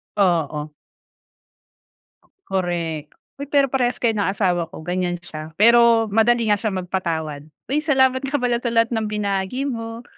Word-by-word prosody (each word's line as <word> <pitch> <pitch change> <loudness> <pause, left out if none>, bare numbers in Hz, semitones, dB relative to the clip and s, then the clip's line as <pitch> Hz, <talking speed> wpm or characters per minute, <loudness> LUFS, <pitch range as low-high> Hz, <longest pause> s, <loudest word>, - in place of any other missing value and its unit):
Oo. 155 -6 0 1.8
Korek. 170 -5 -3 0.3
Uy 280 - -5
pero 280 -2 +3
parehas 245 -2 +1
kayo 235 -2 +2
ng 200 - +1
asawa 180 -4 0
ko. - - -10
Ganyan 180 0 -1
siya, 155 -2 -9
pero 235 +1 +6
madali 230 +1 +3
nga 205 - +4
siya 220 - 0
magpatawad. 170 -5 -3 0.3
Uy 285 +3 +1
salamat 265 -3 +2
nga 275 +1 -1
pala 245 -1 0
sa 240 - -1
lahat 230 0 +3
ng 220 -1 -1
binahagi 205 +5 -2
mo. 230 -1 -6
210 Hz, 145 wpm, -21 LUFS, 175-240 Hz, 1.8 s, pero